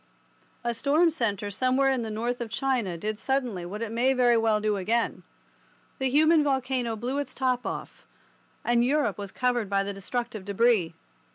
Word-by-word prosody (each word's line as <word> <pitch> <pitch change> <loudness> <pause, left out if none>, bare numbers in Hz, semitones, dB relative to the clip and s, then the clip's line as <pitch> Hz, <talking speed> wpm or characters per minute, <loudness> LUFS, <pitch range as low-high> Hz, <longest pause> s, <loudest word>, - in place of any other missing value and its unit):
A 240 0 0
storm 300 +8 +3
centre 210 - -2
somewhere 255 +5 +2
in 260 -2 0
the 225 - -4
north 235 +3 -2
of 235 - -4
China 240 -7 -1
did 215 +4 -4
suddenly 245 -10 -1
what 210 +5 -5
it 225 - -4
may 245 +4 +2
very 245 -2 +4
well 225 -2 +2
do 210 0 0
again. 225 +5 0 0.8
The 265 -1 +1
human 310 +3 +5
volcano 260 -4 0
blew 250 +6 -2
its 275 -2 -5
top 255 -1 0
off, - - -6 0.6
and 240 0 +3
Europe 260 -6 +1
was 200 -1 -6
covered 245 -4 0
by 195 -1 +2
the 200 0 -4
destructive 225 +2 -4
debris. 200 -4 +2
235 Hz, 175 wpm, -27 LUFS, 210-260 Hz, 0.8 s, human